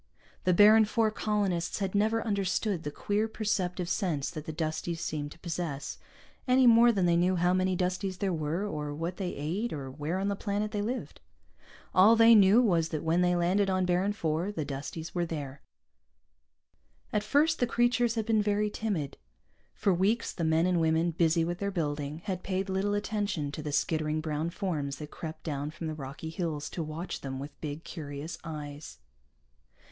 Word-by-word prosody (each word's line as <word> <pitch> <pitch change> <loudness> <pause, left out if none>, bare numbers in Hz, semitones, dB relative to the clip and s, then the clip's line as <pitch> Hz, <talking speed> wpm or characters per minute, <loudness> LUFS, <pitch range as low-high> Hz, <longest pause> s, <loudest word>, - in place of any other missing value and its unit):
The 180 - +4
Baron 215 +3 +8
IV 220 0 +2
colonists 200 -6 -1
had 195 -2 -2
never 220 +3 +1
understood 200 -2 0
the 150 - -4
queer 205 +8 -1
perceptive 190 -5 -1
sense 170 -8 -1
that 155 -3 -7
the - - -2
Dusties 160 +1 -3
seemed 145 -2 -3
to - - -20
possess, 165 -5 -4 0.5
any 255 +1 +5
more 235 0 +7
than 195 -5 +1
they 170 -1 +3
knew 180 +2 +3
how 175 +1 +2
many 185 0 +1
Dusties 185 +1 -1
there 190 -1 -1
were, 160 +5 -1
or 150 -6 -4
what 165 +4 -4
they 185 -3 -3
ate, 180 +11 -2
or 135 -3 -5
where 150 +6 -3
on 195 +1 -1
the 200 - 0
planet 205 +1 -2
they 210 -2 -1
lived. 245 +5 -4 0.7
All 205 +5 +7
they 230 0 +7
knew 210 +3 +7
was 170 -7 +2
that 155 - -3
when 165 +2 +2
they 180 0 +3
landed 185 +3 +2
on 185 -1 +1
Baron 180 +2 +1
IV, 175 0 -1
the 155 - -2
Dusties 145 +4 -6
were 175 -1 0
there. 140 -4 -6 1.5
At 210 - +2
first 295 +9 +2
the 245 - +2
creatures 240 -1 +2
had 220 -2 -1
been 220 -1 +3
very 210 0 +1
timid. 190 -12 -3 0.6
For 195 - +2
weeks 205 +6 +1
the 170 - -3
men 160 +1 +3
and 180 -2 +2
women, 160 +1 +2
busy 165 0 +2
with 175 +1 -3
their 200 - -1
building, 150 -3 -3
had 185 -3 -3
paid 190 +1 -2
little 195 +2 0
attention 205 -8 -2
to 155 - -6
the 150 0 -4
skittering 155 +1 0
brown 155 +1 -2
forms 165 -7 -3
that 150 +2 -9
crept 160 -1 -7
down 145 -2 -3
from 165 +2 -7
the 155 - -2
rocky 145 +2 -7
hills 160 -4 -3
to 170 - -4
watch 160 +3 -5
them 135 -1 -5
with 140 +2 -6
big, 150 +1 -5
curious 150 -1 -7
eyes. 150 -2 -7
175 Hz, 190 wpm, -29 LUFS, 155-205 Hz, 1.5 s, Baron